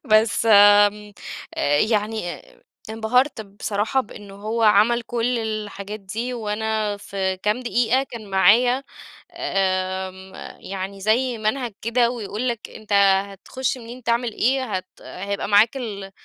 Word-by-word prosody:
بس 220 +1 +3
آمم 205 0 +6 0.4
آآ 145 0 +1
يعني 215 -3 0
ا - - -20 0.3
انبهَرت 240 +4 +1
بصراحة 205 +5 -2
بإن 205 -4 -11
هو 215 +4 -3
عَمل 220 +3 +4
كل 240 +1 -1
الحاجات 215 -2 -5
دي، 225 +6 -4
وأنا 215 -1 -2
في 190 -2 -3
كام 210 +6 -1
دقيقة 245 +1 +1
كان 230 -6 -9
معايا، 235 +8 +4 0.5
آمم، 190 0 -2 0.3
يعني 195 +1 -6
زي 235 +3 +1
منهج 225 +1 -2
كده 235 +1 +2
ويقول 230 0 -4
لك، 235 -1 -5
أنت 215 -2 -7 0.4
هتخش 260 +7 -4
منين 240 +1 -10
تعمل 235 0 0
إيه 260 +3 +1
هت 185 0 -8
هيبقى 200 +2 -5
معاك 215 +5 +4
ال 200 -6 -6
215 Hz, 130 wpm, -22 LUFS, 200-235 Hz, 0.5 s, آمم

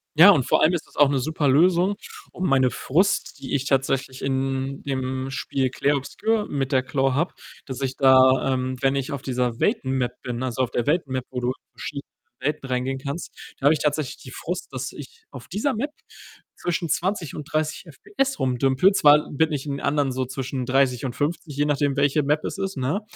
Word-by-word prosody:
Ja, 175 +6 +9
und 140 -9 +3
vor - - +2
allem 165 +3 +4
ist 170 - -2
das - - -21
auch 145 -1 +6
'ne 140 -2 +1
super 155 +2 -1
Lösung, 175 +7 +4 0.4
um 185 - -3
meine 130 -2 +4
Frust, 180 - 0
die 140 - -3
ich 135 0 -1
tatsächlich 135 -1 0
in 135 0 -2
dem 130 -1 -3
Spiel 135 -1 -1
Clair 145 +3 +1
Obscur 210 +10 -1
mit 135 -1 -2
der 130 -1 +3
Claw 135 0 0
habe, 165 +7 0 0.3
dass 130 -1 -6
ich 130 -1 -2
da, 130 0 +5
ähm, 130 0 -2
wenn 135 0 +2
ich 135 +1 -2
auf 135 - -4
dieser 125 -3 -2
Welten-Map 130 - 0
bin, 125 0 -4
also 130 0 -1
auf 125 - -3
der 120 - -1
Welt-Map, 135 -5 0
wo 125 - -4
du 120 - -2
in - - 0 0.2
verschiedene 140 -2 -7 0.3
Welten 145 -1 -2
reingehen 130 +1 -1
kannst 140 +5 -5 0.3
da 135 - -4
habe 150 - +7
ich - - -4
tatsächlich 150 -2 -1
die - - -12
Frust, - - -5
dass - - -4
ich - - -12
auf 125 - -11
dieser 220 +9 -1
Map 280 +7 -2 0.6
zwischen 175 -1 -2
20 175 -2 -1
und 150 - -7
30 155 +2 -1
FPS 235 - -3
rum 130 -2 0
dümpele. 135 +9 +4
Zwar 150 -3 +5
bin 160 +2 +1
ich 145 0 -3
in 140 -1 -3
anderen 140 -1 +1
so 130 0 -2
zwischen 130 0 -4
30 130 -1 +2
und 120 - -4
50, 150 0 -2
je 145 +1 +1
nachdem, 145 -1 +1
welche 145 +1 +2
Map 150 +2 +1
es - - -4
ist, 195 -5 -3
ne? 140 +11 -1
140 Hz, 210 wpm, -24 LUFS, 130-155 Hz, 0.6 s, Ja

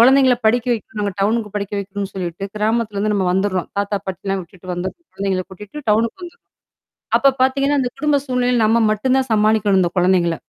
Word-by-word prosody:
கொழந்தைங்கள 260 +1 +6
படிக்க 240 +2 +2
வைக்கணும் 220 -1 -5
நாங்க 200 -2 -2
டவுனுக்கு 210 0 0
படிக்க 200 0 -4
வைக்கணும்ன்னு 200 0 -5
சொல்லிட்டு, 180 0 -4
கிராமத்துலருந்து 215 -1 0
நம்ம 190 -2 +1
வந்துர்றோம். 190 -1 -1
தாத்தா, 200 0 0
பாட்டியெல்லாம் 195 0 -3
விட்டுட்டு 180 +1 -9
வந்து 180 +2 -3 0.2
குழந்தைங்களை 190 -2 -2
கூட்டிட்டு 210 +9 -10
டவுனுக்கு 230 - +1
வந்துர்றோம். 350 +7 -13 0.7
அப்போ 275 - +5
பாத்தீங்கன்னா, 275 +2 +2
அந்த 245 - -1
குடும்ப 295 0 +2
சூழ்நிலையில 250 -1 +1
நம்ம 225 +1 +3
மட்டும் 255 +5 +1
தான் 265 - -2
சமாளிக்கணும் 210 -2 +3
இந்த 175 - +2
கொழந்தைங்கள. 180 -2 +3
210 Hz, 170 wpm, -19 LUFS, 190-245 Hz, 0.7 s, கொழந்தைங்கள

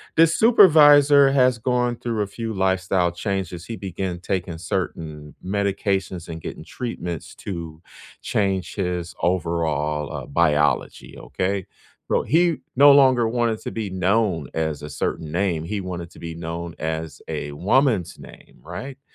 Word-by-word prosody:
This 165 +1 +4
supervisor 145 - +7
has 130 -3 +3
gone 125 +1 0
through 115 -3 -3
a 100 - -1
few 115 +2 -5
lifestyle 95 -2 +1
changes. 90 -2 -4
He 115 - -5
began 95 -2 -4
taking 90 -2 -3
certain 80 -5 -4
medications 95 -2 -1
and 80 0 -6
getting 80 - -8
treatments 90 - -6
to 85 -4 -7 0.4
change 95 -3 -1
his 90 -3 -3
overall, 80 -4 -1
uh, - - -5
biology, 75 -1 +1
okay? 95 0 -3 0.4
Well, - - +2
he 165 +5 +2 0.2
no 140 +2 +8
longer 130 -4 +5
wanted 115 -1 0
to - - -5
be 110 -3 -4
known 95 - 0
as 80 -2 -2
a 75 - -6
certain 75 +1 -3
name. 85 -3 0
He 100 +4 -3
wanted 85 -2 -6
to - - -15
be 85 -1 -7
known 85 0 -6
as 80 0 -4
a 75 - -4
woman's 105 - +1
name, - - -15
right? 130 - -8
95 Hz, 145 wpm, -23 LUFS, 85-115 Hz, 0.4 s, no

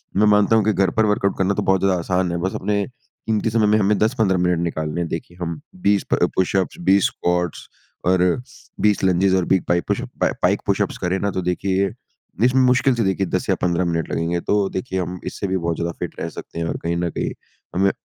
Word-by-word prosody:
मैं 105 +2 +4
मानता 105 +1 +4
हूँ 110 - +4
कि 110 - +3
घर 95 -1 +2
पर 110 - +4
वर्कआउट 105 -2 +1
करना 95 +1 +2
तो - - -1
बहुत 95 0 +3
ज़्यादा 95 -1 +2
आसान 90 0 0
है, 85 - -1
बस 95 +3 -2
अपने 100 +1 0
कीमती 115 -3 -4
समय 110 -1 +2
में 105 +1 +4
हमें 105 0 +2
10-15 110 -4 +2
मिनट 90 -1 +1
निकालने 80 -1 -2
हैं। 85 - -2
देखिए 85 +2 -6
हम 85 -2 -3 0.2
20 100 0 +3
प - - +3
पुशअप्स 95 0 +1
20 100 0 +5
स्क्वाट्स 90 -2 -2 0.4
और 90 0 +3 0.6
20 105 -2 +2
लंजेस 95 +1 +3
और 95 -2 +1
20 95 0 +2
पाइ 85 0 +3
पुशअप - - -3 0.2
पाइक - - +2
पुशअप्स - - 0
करें 90 +1 -1
ना, 100 +1 -1
तो 95 - -2
देखिए 95 +2 0 0.5
इसमें 125 +2 +4
मुश्किल 125 +1 +4
से 115 - 0
देखिए 95 0 0
10 - - -2
या - - +4
15 90 0 +1
मिनट 85 -2 -1
लगेंगे। 85 +1 -1
तो 100 +1 +1
देखिए 95 0 -3
हम 90 +1 -5
इससे 100 - -4
भी 95 0 0
बहुत 85 -1 -1
ज़्यादा 85 +1 -2
फ़िट - - -5
रह - - -3
सकते - - -8
हैं, 85 - -1
और - - -2
कहीं 85 0 -1
न 85 0 -1
कहीं - - -1 0.4
हमें 95 +2 +3
95 Hz, 225 wpm, -21 LUFS, 85-100 Hz, 0.6 s, 20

